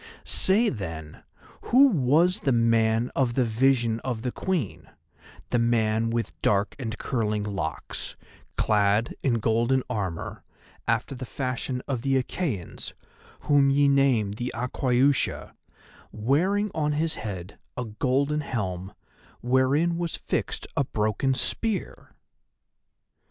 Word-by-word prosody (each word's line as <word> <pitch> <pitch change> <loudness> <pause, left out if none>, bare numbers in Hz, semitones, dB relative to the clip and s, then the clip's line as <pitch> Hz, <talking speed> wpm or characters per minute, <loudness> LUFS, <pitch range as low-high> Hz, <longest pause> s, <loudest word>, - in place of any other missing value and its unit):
Say, 215 +5 +4
then, 80 - -6 0.4
who 260 +4 +6
was 170 - +3
the 135 - 0
man 115 0 +2
of 125 -3 +1
the 130 - +3
vision 115 0 +2
of 120 -2 -4
the 125 - -1
Queen, 170 - -3 0.6
the 120 - +2
man 115 -1 +2
with 115 -2 -2
dark 100 0 +1
and 110 -3 -4
curling 105 -4 -1
locks, 85 -9 -4 0.4
clad 105 +2 +2
in 130 -4 +2
golden 115 +4 +1
armour 95 -8 -4 0.4
after - - 0
the 130 0 -7
fashion 130 0 -3
of 130 -4 -2
the 135 +1 +1
Achæans 125 - -4 0.5
whom 145 -2 +4
ye 140 +1 +4
name 135 -7 +3
the 120 +4 -4
Aquaiusha, 125 +2 +1 0.6
wearing 180 - +1
on 150 -1 0
his 160 +2 0
head 95 -3 -7 0.2
a 125 - -2
golden 135 +6 0
helm, 95 -8 -4 0.5
wherein 130 +7 +2
was 170 -1 -2
fixed - - -3
a 140 - +2
broken 110 +3 0
spear?" 220 - -2
125 Hz, 120 wpm, -26 LUFS, 110-140 Hz, 0.6 s, who